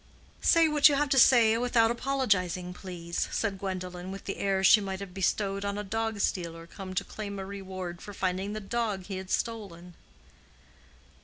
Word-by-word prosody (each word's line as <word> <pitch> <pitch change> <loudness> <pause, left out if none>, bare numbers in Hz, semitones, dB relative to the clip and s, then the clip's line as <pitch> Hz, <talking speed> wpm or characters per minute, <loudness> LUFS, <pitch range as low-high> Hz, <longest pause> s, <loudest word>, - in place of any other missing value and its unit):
"Say 330 -1 +5
what 300 -1 +6
you 285 - +2
have 290 +1 +1
to 270 - +4
say 230 -3 +6
without 235 -2 +3
apologizing, 200 -9 0
please," 175 -2 -4
said 200 -3 -1
Gwendolen, 185 -2 -5
with 195 - -8
the 195 - -4
air 195 -1 0
she 210 +2 +7
might 190 -1 -4
have 200 -2 -8
bestowed 195 +1 0
on 200 0 -2
a 210 - -3
dog 225 +1 -2
stealer 165 -3 -2
come 185 +2 -9
to - - +1
claim 200 -2 -6
a 195 - -5
reward 185 -3 -6
for 205 - -8
finding 190 +1 -2
the 215 - -3
dog 215 -2 -2
he 195 -1 -5
had 190 0 -7
stolen. 190 -8 -3
195 Hz, 180 wpm, -29 LUFS, 185-225 Hz, -, she